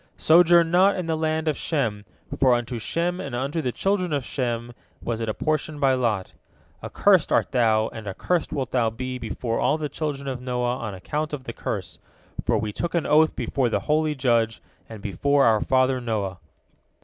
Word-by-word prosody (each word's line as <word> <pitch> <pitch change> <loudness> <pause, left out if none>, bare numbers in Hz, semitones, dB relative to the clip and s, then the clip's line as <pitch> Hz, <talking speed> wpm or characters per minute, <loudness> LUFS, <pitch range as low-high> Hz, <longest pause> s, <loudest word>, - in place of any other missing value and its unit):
Sojourn 170 0 +5
not 190 +3 +5
in 180 - -3
the 165 -1 0
land 160 0 -1
of 155 - +2
Shem, 115 -12 -2 0.3
for 130 -2 +5
unto 120 0 -3
Shem 175 +9 -1
and 140 -8 -5
unto 140 +6 -2
the 125 - -1
children 190 +3 0
of 140 -4 -1
Shem 120 -2 -3 0.3
was 115 -1 -3
it 115 - -2
apportioned 155 +5 -2
by 135 -2 +3
lot. 115 -7 -1 0.5
Accursed 190 -6 +3
art - - +2
thou, 110 -4 +3
and 110 -2 -9
accursed 165 - -1
wilt 135 -4 -3
thou 120 -3 +2
be 125 +3 -5
before 115 0 -3
all 150 - +2
the 150 -2 -3
children 145 -3 -4
of 130 -2 -4
Noah 125 -1 -1
on 110 -5 -5
account 150 +11 -4
of 140 -3 -4
the 115 - -6
curse, 90 -8 -5 0.4
for - - +1
we 105 -1 -3
took 170 +8 -3
an 170 - +1
oath 155 +1 +4
before 130 -4 0
the - - 0
holy 155 0 +1
Judge 115 -4 +1 0.3
and 110 -3 -10
before 140 +8 +2
our 110 -2 +4
father 130 0 +2
Noah." 100 -6 -3
130 Hz, 190 wpm, -24 LUFS, 115-155 Hz, 0.5 s, Sojourn